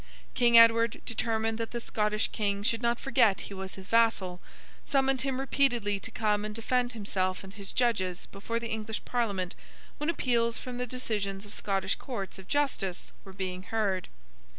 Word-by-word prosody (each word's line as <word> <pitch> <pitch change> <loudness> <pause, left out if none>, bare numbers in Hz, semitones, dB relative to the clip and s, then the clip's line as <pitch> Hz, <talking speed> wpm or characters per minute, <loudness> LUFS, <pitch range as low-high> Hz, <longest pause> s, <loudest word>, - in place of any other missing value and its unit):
King 235 -1 +5
Edward, 230 0 +6
determined 225 -1 0
that 230 - -2
the 240 - -4
Scottish 210 -2 0
King 200 -2 -1
should 230 +2 +2
not 235 0 +1
forget 240 -7 +3
he - - -8
was 190 -1 -6
his 190 0 -10
vassal, 215 -6 +2 0.4
summoned 270 -2 +2
him 265 0 -1
repeatedly 240 -7 +1
to 225 - -6
come 210 -2 0
and 210 0 -4
defend 245 +2 0
himself 190 -4 -1
and 195 0 -10
his 200 -2 -7
judges 195 -7 0
before 230 +4 -3
the 235 0 -5
English 220 0 -3
Parliament 200 -7 -1 0.5
when 300 +2 -1
appeals 235 -7 +1
from 250 -1 -6
the 250 - -2
decisions 210 -5 -3
of 205 - -13
Scottish 195 -1 0
courts 200 -7 -5
of 190 - -12
justice 260 -11 -1
were 195 - -11
being 185 -1 -4
heard. 195 -2 -1
220 Hz, 175 wpm, -29 LUFS, 195-240 Hz, 0.5 s, Edward